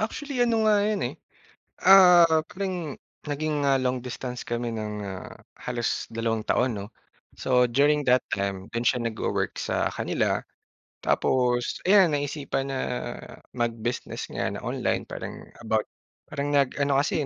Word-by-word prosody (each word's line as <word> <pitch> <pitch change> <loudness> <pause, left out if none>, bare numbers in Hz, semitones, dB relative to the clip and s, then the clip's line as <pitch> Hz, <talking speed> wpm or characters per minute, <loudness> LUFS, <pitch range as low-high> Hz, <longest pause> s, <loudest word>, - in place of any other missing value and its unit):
Actually 260 +5 -3
ano 230 -2 +3
nga 210 -1 +4
yun 210 -1 0
eh, - - -14 0.7
ah, 180 -2 +9 0.2
parang 180 -6 -4 0.3
naging, 145 0 -1
ah, 135 - +4
long 130 -1 0
distance 125 0 -6
kami 120 0 -2
ng, 105 -2 -4
ah, 95 -2 -7 0.3
halos 120 -1 -1
dalawang 115 -1 -2
taon 120 -5 +1
'no. 100 - -6 0.5
So 125 -1 +3
during 145 +4 +2
that 125 +1 +4
time, 100 -1 -3
dun 115 +1 -1
siya 125 -2 +2
nagwo-work 115 -1 -2
sa - - -1
kanila, - - 0 0.6
tapos 125 -2 +1
ayan 190 -5 +6
naisipan 140 -1 -2
na 135 - -2 0.8
mag-business 120 0 -3
nga - - -2
na - - -6
online - - -1
parang - - -6 0.3
about - - 0 0.4
parang 145 +1 -2
nag-ano 140 0 +2
kasi, 150 +1 -1
130 Hz, 140 wpm, -26 LUFS, 120-155 Hz, 0.8 s, ah